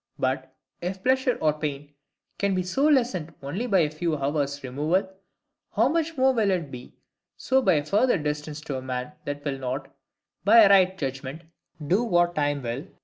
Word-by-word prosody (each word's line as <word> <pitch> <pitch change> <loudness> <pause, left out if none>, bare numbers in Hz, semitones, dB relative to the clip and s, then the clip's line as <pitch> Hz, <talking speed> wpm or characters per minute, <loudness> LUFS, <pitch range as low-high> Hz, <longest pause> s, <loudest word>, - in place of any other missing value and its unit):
But, 130 0 -2 0.3
if 185 +2 -4
pleasure 260 -1 +2
or 155 -1 +3
pain 145 -1 -5 0.5
can 200 -1 +1
be 185 - 0
so 265 +11 +1
lessened 235 - +1
only 180 - -3
by 195 -6 +4
a 150 - +1
few 155 0 -2
hours' 140 0 -2
removal, 150 +9 0 0.7
how 230 +5 +4
much 325 0 -1
more 265 0 +4
will 220 -5 +2
it 170 -7 -1
be 125 -1 -10 0.4
so 265 0 +2
by 250 - +3
a 145 -1 0
further 210 +8 +3
distance 150 0 -4
to 140 -3 -4
a - - -5
man 125 +1 -4
that 145 0 -5
will 135 -2 -2
not, 135 +1 -4 0.5
by 220 +4 +8
a 200 - +6
right 190 -1 +5
judgment, 135 +1 -5 0.4
do 190 +10 +2
what 175 -5 +2
time 145 -3 -1
will, 120 +3 -3
i. 175 - -14
155 Hz, 190 wpm, -25 LUFS, 140-200 Hz, 0.7 s, by